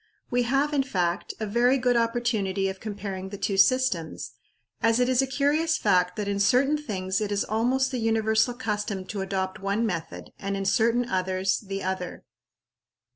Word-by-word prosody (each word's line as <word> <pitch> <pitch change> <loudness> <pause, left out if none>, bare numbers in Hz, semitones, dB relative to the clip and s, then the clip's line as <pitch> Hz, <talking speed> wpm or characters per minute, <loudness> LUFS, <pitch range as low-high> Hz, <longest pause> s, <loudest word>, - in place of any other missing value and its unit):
We 245 0 +2
have, 280 +3 +1
in 285 - +3
fact, 180 -8 -2
a 220 - -2
very 240 +5 +3
good 250 -1 +2
opportunity 230 -5 0
of 190 0 -6
comparing 200 -3 -5
the 200 - -7
two 200 0 -1
systems, 195 - +2 0.5
as 230 +1 +3
it 250 - +3
is 255 0 +3
a 270 - 0
curious 295 +5 +1
fact 180 -3 +2
that 210 -2 -3
in 200 0 -1
certain 265 +8 +3
things 195 -9 -2
it 210 -1 -2
is 200 0 +1
almost 250 +5 +1
the 255 - -2
universal 225 +1 +2
custom 210 -4 -3
to 200 0 -4
adopt 190 -1 -3
one 200 +4 0
method, 170 -7 -5
and 200 0 -3
in 195 - -3
certain 235 +4 +2
others, 185 -1 0
the 195 -2 -5
other. 185 -1 -4
215 Hz, 180 wpm, -26 LUFS, 190-245 Hz, 0.5 s, in